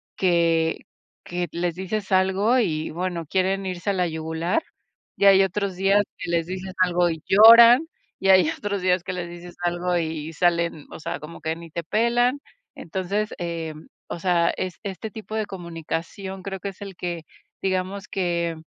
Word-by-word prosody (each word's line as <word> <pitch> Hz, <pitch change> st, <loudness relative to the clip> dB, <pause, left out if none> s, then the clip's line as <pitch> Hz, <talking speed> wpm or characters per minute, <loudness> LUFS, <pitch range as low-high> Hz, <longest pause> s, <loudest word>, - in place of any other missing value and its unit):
que 165 Hz, -3 st, +2 dB, 0.5 s
que 175 Hz, 0 st, -2 dB
les 170 Hz, 0 st, -1 dB
dices 190 Hz, +2 st, -4 dB
algo 190 Hz, +6 st, +3 dB
y, 160 Hz, -9 st, -1 dB
bueno, 175 Hz, 0 st, -3 dB
quieren 190 Hz, +4 st, 0 dB
irse 185 Hz, +1 st, -3 dB
a -, -, +2 dB
la 180 Hz, -2 st, +1 dB
yugular, 160 Hz, -, -1 dB, 0.6 s
y -, -, +2 dB
hay 195 Hz, -1 st, +8 dB
otros 195 Hz, 0 st, -2 dB
días 195 Hz, +2 st, +3 dB, 0.2 s
que -, -, -5 dB
les 170 Hz, -1 st, +1 dB
dices 185 Hz, +1 st, -6 dB
algo 180 Hz, -1 st, +3 dB
y 160 Hz, -2 st, -5 dB
lloran, 230 Hz, +7 st, +8 dB, 0.3 s
y 195 Hz, -, 0 dB
hay 185 Hz, -4 st, +6 dB
otros 200 Hz, -2 st, -3 dB
días 180 Hz, -1 st, +2 dB
que -, -, -4 dB
les 180 Hz, -1 st, -4 dB
dices 175 Hz, 0 st, -10 dB
algo 175 Hz, +1 st, 0 dB
y 160 Hz, -1 st, -3 dB
salen, 170 Hz, -2 st, +1 dB
o -, -, -9 dB
sea, -, -, -4 dB
como 155 Hz, +2 st, -10 dB
que 160 Hz, +1 st, -2 dB
ni 165 Hz, -1 st, -11 dB
te 170 Hz, +1 st, -4 dB
pelan. 240 Hz, -, +1 dB, 0.3 s
Entonces, 190 Hz, +5 st, -3 dB
eh, 165 Hz, -2 st, -4 dB, 0.3 s
o -, -, -5 dB
sea, 170 Hz, -1 st, +2 dB
es 185 Hz, -2 st, -4 dB
este 200 Hz, +1 st, -5 dB
tipo 215 Hz, +1 st, -9 dB
de 215 Hz, -1 st, -1 dB
comunicación 175 Hz, +1 st, -6 dB
creo 195 Hz, 0 st, -5 dB
que 200 Hz, -, -4 dB
es 195 Hz, -, -14 dB
el 195 Hz, -2 st, -9 dB
que, 175 Hz, -2 st, -4 dB, 0.4 s
digamos 190 Hz, +1 st, -2 dB
que, 170 Hz, -3 st, -1 dB
180 Hz, 175 wpm, -24 LUFS, 170-195 Hz, 0.6 s, hay